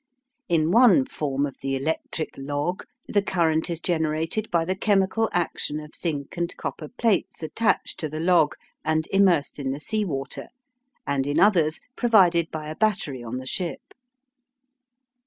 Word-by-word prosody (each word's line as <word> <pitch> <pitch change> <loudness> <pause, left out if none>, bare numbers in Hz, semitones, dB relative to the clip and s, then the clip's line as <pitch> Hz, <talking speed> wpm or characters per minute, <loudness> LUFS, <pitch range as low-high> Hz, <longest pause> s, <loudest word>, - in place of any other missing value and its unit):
In 165 -1 +2
one 250 +4 +6
form 145 - -2
of 140 - -7
the 135 0 -1
"electric 155 +3 -3
log," 145 +6 -3 0.2
the 205 - +2
current 165 -4 +1
is 170 -2 -2
generated 165 +5 -1
by 170 -1 +1
the 185 +2 -1
chemical 200 +2 +2
action 165 -3 -1
of 150 0 -11
zinc 150 -1 -4
and 170 0 -2
copper 155 - -5
plates 225 -7 0
attached 220 +8 0
to 155 - -2
the 155 +1 -5
log, 165 -3 +3 0.3
and 160 0 0
immersed 180 -8 +3
in 135 -2 -2
the 135 +2 -3
sea 215 +7 -1
water, 135 -7 -4 0.6
and 140 -1 0
in 145 +3 +1
others 170 -6 +4 0.2
provided 180 -8 +4
by 155 -1 -6
a 155 - -5
battery 175 - 0
on 120 +2 -5
the 130 - -6
ship. 175 +6 -4
160 Hz, 155 wpm, -25 LUFS, 150-190 Hz, 0.6 s, one